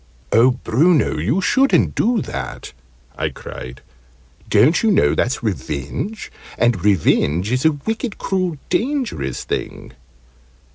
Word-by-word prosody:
"Oh, 120 +3 +5
Bruno, 140 - +2
you 120 - 0
shouldn't 270 +8 +3
do 235 -2 +1
that!" 65 -2 -6 0.4
I - - -1
cried. 65 +1 -9 0.7
"Don't 120 +11 +4
you 225 - +2
know 200 - +3
that's 130 +2 -1
revenge? 105 - -4 0.3
And 120 -7 +1
revenge 95 -1 +2
is 130 +4 0
a 160 - +6
wicked, 220 - -4
cruel, 185 -4 -2
dangerous 240 - -1
thing!" - - -5
130 Hz, 115 wpm, -19 LUFS, -, 0.7 s, a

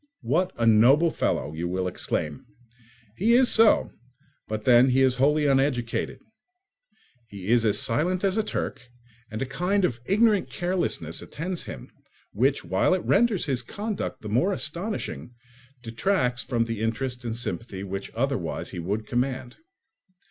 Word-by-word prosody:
"What 185 +1 +1
a 115 - 0
noble 130 +9 +5
fellow!" 75 - -1
you 85 +2 -3
will 90 +1 -2
exclaim. 75 -4 -3 0.7
He 230 +5 +3
is 255 0 +6
so; 225 -1 +5 0.6
but 110 0 -4
then 125 +1 +6
he 130 +1 +3
is 130 -1 +2
wholly 150 +3 +3
uneducated: 135 -4 0 1.1
he 100 -2 -8
is 120 -1 +4
as 105 -1 +3
silent 175 - 0
as 195 -1 +2
a 220 - +2
Turk, 210 - -4 0.5
and 110 +3 -3
a - - -3
kind 180 +9 0
of 120 -7 -2
ignorant 210 0 +3
carelessness 175 - -2
attends 180 +3 -5
him, 65 -6 -9 0.4
which, 135 +7 +1
while - - +2
it 185 - -4
renders 215 -3 +2
his 130 -4 0
conduct 205 - -5
the - - -6
more 125 - +2
astonishing, 170 - -4 0.5
detracts 125 - 0
from 120 -3 0
the 115 -2 -4
interest 125 +3 -2
and 115 -1 -4
sympathy 115 -4 -4
which 100 0 -5
otherwise 115 - -2
he - - -6
would 100 +6 -3
command. 125 0 -2
125 Hz, 150 wpm, -25 LUFS, 110-180 Hz, 1.1 s, is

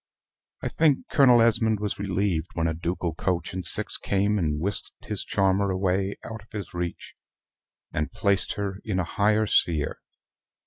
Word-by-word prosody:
I - - 0
think 150 -4 +2
Colonel 125 -5 +6
Esmond 110 -2 +2
was 105 -1 -3
relieved 95 -4 0
when 80 - 0
a 80 - 0
ducal 85 +1 -2
coach 90 +2 -2
and 95 0 -3
six 90 - -2
came 100 +1 +1
and 75 -4 0
whisked 100 +6 -4
his 105 -3 -3
charmer 100 0 +2
away 95 +1 0
out 110 -1 -7
of 105 - -21
his 105 -3 -6
reach, 85 -1 -4 0.8
and 75 -2 -1
placed 100 -1 +1
her 100 -1 -3
in 100 -4 -1
a - - +2
higher 105 +4 +2
sphere. 80 -7 +1
95 Hz, 165 wpm, -26 LUFS, 90-105 Hz, 0.8 s, Colonel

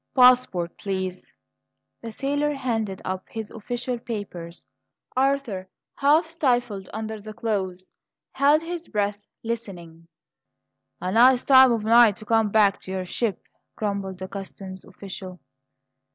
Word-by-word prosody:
"Passports, 250 -9 +5
please." 190 -2 -4 0.7
The 230 - -6
sailor 285 +4 -1
handed 225 -7 -2
up 185 0 -3
his 220 -2 -6
official 240 +2 -4
papers. 185 -7 -7 0.5
Arthur, 260 -8 0 0.3
half 300 +4 +3
stifled 245 - 0
under 220 0 -5
the 215 +1 -9
clothes, 190 -5 -2 0.5
held 290 +3 +3
his 345 0 -5
breath, 205 -1 -2 0.2
listening. 180 -8 -6 0.9
"A 185 - -2
nice 245 +4 +5
time 260 -2 +8
of 230 -2 0
night 225 -1 +6
to 215 - -12
come 225 -1 +2
back 205 -1 +4
to 190 - -9
your 190 -1 -3
ship!" 205 +1 -2 0.3
grumbled 200 -3 -3
the 190 +1 -6
customs 190 -1 -8
official. 190 -1 -9
215 Hz, 125 wpm, -24 LUFS, 190-250 Hz, 0.9 s, time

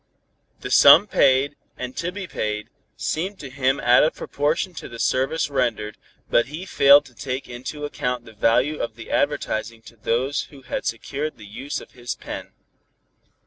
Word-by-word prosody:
The - - -6
sum - - +8
paid, 135 +2 +3 0.2
and 125 0 -6
to 170 +2 -2
be 200 0 -6
paid, 105 -9 -4 0.3
seemed 190 +6 -2
to 140 -6 -9
him 135 0 +1
out 120 0 +5
of 155 - +1
proportion 155 +6 -1
to - - -8
the 115 - -9
service 135 +7 +1
rendered, 120 -6 -1 0.3
but 120 - +3
he 155 +6 -7
failed 140 -4 +6
to 130 - -16
take 130 +1 -5
into 130 +5 -6
account 125 -3 -3
the 110 - -13
value 115 +8 +2
of 115 - -4
the 115 - -10
advertising 115 +1 -1
to 115 - -14
those 125 +6 -1
who 140 -2 -16
had - - -4
secured 140 +6 -4
the 105 - -12
use 130 +8 -5
of - - -14
his 120 -2 -5
pen. - - -8
130 Hz, 175 wpm, -23 LUFS, 115-145 Hz, 0.3 s, sum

